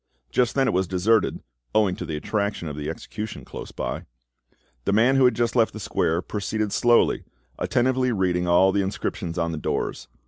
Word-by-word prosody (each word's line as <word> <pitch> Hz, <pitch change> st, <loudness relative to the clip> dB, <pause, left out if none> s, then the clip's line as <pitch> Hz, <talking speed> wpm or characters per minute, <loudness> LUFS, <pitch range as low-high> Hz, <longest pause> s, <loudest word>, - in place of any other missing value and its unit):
Just 125 Hz, -2 st, +1 dB
then 135 Hz, -1 st, +3 dB
it -, -, +1 dB
was 95 Hz, 0 st, +1 dB
deserted, 95 Hz, +4 st, +1 dB, 0.3 s
owing 105 Hz, -4 st, +3 dB
to -, -, -5 dB
the 80 Hz, -, -3 dB
attraction 100 Hz, +2 st, -2 dB
of 75 Hz, -, -5 dB
the 75 Hz, 0 st, -4 dB
execution 105 Hz, +6 st, -6 dB
close -, -, -8 dB
by. -, -, -4 dB, 0.8 s
The -, -, +1 dB
man 120 Hz, +6 st, +4 dB
who 135 Hz, -1 st, +5 dB
had 125 Hz, -, +4 dB
just 120 Hz, 0 st, 0 dB
left 115 Hz, -2 st, +3 dB
the 110 Hz, -, -7 dB
square 85 Hz, -3 st, 0 dB
proceeded 105 Hz, 0 st, -2 dB
slowly, 120 Hz, -1 st, +3 dB, 0.4 s
attentively 130 Hz, +1 st, +1 dB
reading 90 Hz, -4 st, 0 dB
all 90 Hz, +2 st, +5 dB
the 100 Hz, -, +1 dB
inscriptions 95 Hz, -2 st, -3 dB
on 85 Hz, -1 st, 0 dB
the 80 Hz, -, -4 dB
doors. -, -, -2 dB
100 Hz, 185 wpm, -24 LUFS, 90-115 Hz, 0.8 s, who